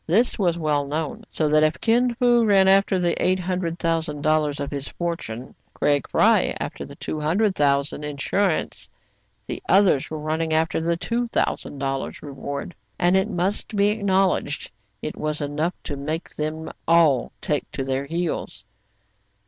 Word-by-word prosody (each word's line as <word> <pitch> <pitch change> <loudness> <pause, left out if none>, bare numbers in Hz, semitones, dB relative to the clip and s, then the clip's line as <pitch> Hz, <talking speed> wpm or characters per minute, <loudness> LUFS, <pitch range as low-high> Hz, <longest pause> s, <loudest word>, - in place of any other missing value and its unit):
This 220 +10 +2
was 175 -4 +2
well 150 -3 0
known; 150 +1 -3
so 155 - 0
that 155 +1 +4
if 155 +2 +2
Kin 240 +1 +2
Fo 240 -1 +4
ran 195 -3 +5
after 195 0 +4
the 175 -2 +1
eight 185 +1 +3
hundred 180 -2 -2
thousand 165 -4 -1
dollars 155 -2 +1
of 140 - -4
his 140 -1 -4
fortune, 150 -9 -5 0.2
Craig 145 -3 +1
Fry - - +3
after - - -5
the - - -11
two 155 - -4
hundred 190 +7 +2
thousand 140 -2 +1
insur 150 +7 0
ance, - - -9 0.6
the - - -5
others 190 -8 +4
were 155 - -4
running 155 +1 -1
after 160 +1 +1
the 170 +1 0
two 235 +6 -2
thou - - +2
sand 140 - -9
dollars 135 0 -3
reward; 140 +3 -6 0.2
and 175 +1 +3
it 190 +2 +2
must 190 +3 -1
be 200 0 +4
acknowledged 195 -3 0 0.3
it - - -3
was 150 0 -2
enough 150 +4 -1
to 145 - -4
make 155 +4 -4
them 155 +1 -4 0.2
all 160 -7 +4
take 150 -2 -2
to 135 - -4
their 135 +1 -2
heels. 170 +2 -3
160 Hz, 170 wpm, -23 LUFS, 145-190 Hz, 0.6 s, ran